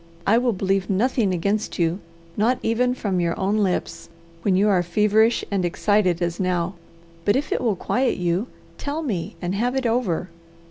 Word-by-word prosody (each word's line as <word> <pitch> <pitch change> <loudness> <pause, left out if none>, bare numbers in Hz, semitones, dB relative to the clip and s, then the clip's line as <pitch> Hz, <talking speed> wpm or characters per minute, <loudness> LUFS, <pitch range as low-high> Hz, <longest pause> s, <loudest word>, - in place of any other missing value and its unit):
I 225 +4 +4
will 245 -1 +1
believe 195 0 0
nothing 215 +1 +1
against 200 +5 -1
you, 170 +2 +1 0.4
not 235 +5 +2
even 245 +2 +1
from 195 -7 -1
your 170 -1 -1
own 200 +3 +1
lips, 195 -4 -1 0.3
when 190 +1 +2
you 200 +3 +3
are 190 -4 +3
feverish 210 +6 +2
and 195 -2 0
excited 180 0 +1
as 170 0 -2
now, 180 -1 0 0.5
but 205 - +3
if 280 +3 -1
it - - 0
will 225 -5 +1
quiet 250 +7 0
you, 180 +5 0 0.3
tell 295 +3 -3
me 200 - -3
and 175 +1 -1
have 240 +6 0
it 265 -1 -1
over. 225 -7 0
200 Hz, 180 wpm, -23 LUFS, 180-230 Hz, 0.5 s, I